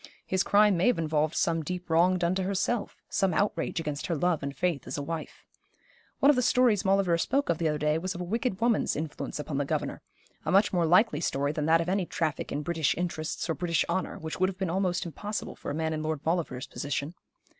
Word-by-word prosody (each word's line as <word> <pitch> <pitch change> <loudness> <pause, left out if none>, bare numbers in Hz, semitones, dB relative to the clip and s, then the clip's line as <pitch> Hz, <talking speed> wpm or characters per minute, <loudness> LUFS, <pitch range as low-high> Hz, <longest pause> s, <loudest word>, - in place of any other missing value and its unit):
His 190 0 +1
crime 205 -1 +4
may 175 - +2
have 245 - +3
involved 155 -1 0
some 165 -1 +1
deep 180 +3 -5
wrong 175 +3 +4
done 175 0 +1
to 190 - -1
herself, 200 +4 -1
some 190 -4 +1
outrage 185 -4 0
against 150 -2 -3
her 170 - 0
love 170 +1 +1
and 140 0 -5
faith 175 -7 -1
as 130 - -4
a 145 - -3
wife. 165 +1 -6 0.7
One 280 - +6
of - - +1
the 250 - +2
stories 240 -4 +3
Maulevrier 190 -4 +2
spoke 275 +9 0
of 165 - +1
the 165 - +1
other 150 -1 0
day 150 +1 +1
was 185 +2 -3
of 175 - -5
a - - -2
wicked 225 +2 -2
woman's 230 -1 +2
influence 155 0 -4
upon 150 -1 -3
the - - +1
governor 135 - -3 0.4
a - - -1
much 195 +2 +4
more 175 -2 +2
likely 180 -2 +4
story 140 -2 0
than 150 0 -2
that 165 +1 +5
of 165 - -3
any 185 -1 0
traffic 160 -3 -2
in 145 +1 -2
British 160 -2 0
interests 170 -3 -3
or 165 - 0
British 170 0 0
honour, 190 +1 -2
which 160 -2 -6
would 185 +1 +3
have 190 - -7
been 185 -3 -2
almost 185 -1 0
impossible 205 +6 -5
for - - -7
a - - -2
man 160 0 -1
in 155 - -3
Lord 155 -2 -2
Maulevrier's 160 -7 -1
position. 145 +4 -4
170 Hz, 235 wpm, -28 LUFS, 155-190 Hz, 0.7 s, One